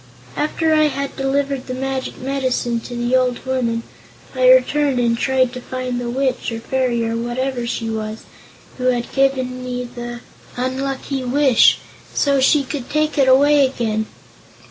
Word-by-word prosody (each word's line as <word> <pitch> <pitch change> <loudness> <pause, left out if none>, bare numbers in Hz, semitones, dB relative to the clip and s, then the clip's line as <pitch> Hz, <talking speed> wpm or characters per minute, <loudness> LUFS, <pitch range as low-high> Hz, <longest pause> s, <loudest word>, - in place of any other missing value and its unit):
"After 315 +2 0
I 310 0 +4
had 280 -1 -4
delivered 275 0 -1
the 255 - -4
magic 265 0 -3
medicine 255 -3 -1
to 245 +2 -8
the 240 +1 0
old 255 -1 +1
woman, 235 -3 -1 0.5
I - - +4
returned 295 - +4
and 235 -1 +2
tried 255 0 +1
to 250 - -6
find 255 -1 -4
the 240 - -3
witch, 260 0 -1
or 225 - -4
fairy, 240 -1 0
or 230 - -2
whatever 240 +1 -2
she 230 -1 -3
was, 220 0 -4 0.6
who 255 - -2
had 245 -2 0
given 260 -2 0
me 250 0 -3
the 240 0 -7 0.4
unlucky 265 +1 -2
wish, 260 -1 +4 0.4
so 280 -1 +2
she 275 +2 +4
could 270 -2 -6
take 305 0 0
it 270 - +4
away 285 +2 +5
again. 220 -5 -1
255 Hz, 160 wpm, -19 LUFS, 240-275 Hz, 0.6 s, away